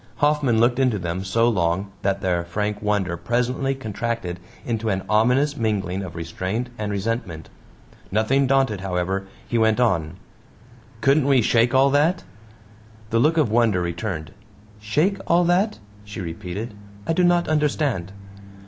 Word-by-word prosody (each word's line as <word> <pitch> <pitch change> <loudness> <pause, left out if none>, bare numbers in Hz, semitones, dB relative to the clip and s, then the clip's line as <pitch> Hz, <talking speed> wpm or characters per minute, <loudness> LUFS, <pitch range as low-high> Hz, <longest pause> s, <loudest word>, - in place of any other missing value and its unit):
Hoffman 145 -6 +2
looked 120 +2 +3
into 130 -5 +2
them 90 0 -3
so 115 +5 +2
long 95 -2 0
that 100 0 0
their 90 -2 0
frank 105 +4 -3
wonder 100 -4 0
presently 125 +6 -1
contracted 115 -6 -4 0.3
into 115 -2 -1
an 95 -2 -1
ominous 125 +7 +3
mingling 100 -4 -1
of 90 -4 -7
restraint 95 +9 -4
and 105 -2 -3
resentment. 100 -6 -3 0.6
Nothing 125 +7 +2
daunted, 135 -7 +2
however, 95 +1 -2 0.2
he 120 - 0
went 110 +1 +3
on: 90 -9 +1 0.9
"Couldn't 140 0 +3
we 135 -4 +4
shake 120 +3 +3
all 135 +1 +5
that?" 155 +6 +2 0.9
The 115 - +2
look 155 +6 +3
of 145 -9 +2
wonder 115 -5 +3
returned. 85 -2 -4 0.5
"Shake 150 - +1
all 175 +1 +4
that?" 180 +5 +2 0.3
she 105 +1 -8
repeated. 95 +5 -5 0.3
"I 165 - 0
do 180 - +2
not 175 0 +3
understand." 145 - 0
110 Hz, 145 wpm, -23 LUFS, 95-135 Hz, 0.9 s, all